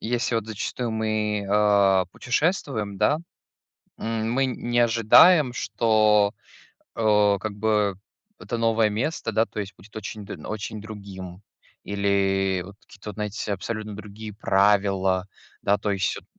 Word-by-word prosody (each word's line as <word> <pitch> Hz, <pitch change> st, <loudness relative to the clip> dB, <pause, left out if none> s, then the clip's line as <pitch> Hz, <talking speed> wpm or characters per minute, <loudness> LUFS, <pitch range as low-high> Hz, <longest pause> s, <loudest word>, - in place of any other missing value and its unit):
если 120 Hz, +1 st, -1 dB
вот 115 Hz, -1 st, -1 dB
зачастую 115 Hz, +3 st, -4 dB
мы, 110 Hz, -2 st, -1 dB
э, 100 Hz, -2 st, +4 dB
путешествуем, 125 Hz, -, -1 dB
да. 150 Hz, -, +3 dB, 0.8 s
М, 115 Hz, 0 st, -2 dB
мы 135 Hz, +2 st, +2 dB
не 120 Hz, -2 st, -1 dB
ожидаем, 120 Hz, -, +6 dB
что, 110 Hz, -4 st, +2 dB, 0.6 s
э, 105 Hz, -2 st, +3 dB
как 110 Hz, +1 st, -4 dB
бы 105 Hz, -2 st, +1 dB, 0.4 s
это 120 Hz, -, -4 dB
новое 115 Hz, -1 st, +2 dB
место, 115 Hz, +3 st, -2 dB
да, 110 Hz, +1 st, +2 dB
то -, -, -7 dB
есть 100 Hz, -1 st, -5 dB
будет 100 Hz, +4 st, -19 dB
очень 105 Hz, 0 st, -6 dB
д 100 Hz, -, -7 dB
очень 110 Hz, 0 st, -5 dB
другим 100 Hz, -4 st, -9 dB, 0.4 s
или 95 Hz, -2 st, +1 dB
вот 100 Hz, -, -12 dB
какие-то 105 Hz, +1 st, -11 dB
вот, 105 Hz, -, -8 dB
знаете, 105 Hz, -1 st, -3 dB
абсолютно 110 Hz, +2 st, -5 dB
другие 105 Hz, 0 st, -9 dB
правила, 95 Hz, -2 st, +2 dB, 0.3 s
да, 100 Hz, +1 st, +2 dB
то 105 Hz, +1 st, -2 dB
есть 95 Hz, -1 st, -1 dB
вот -, -, -12 dB
105 Hz, 140 wpm, -24 LUFS, 100-115 Hz, 0.8 s, ожидаем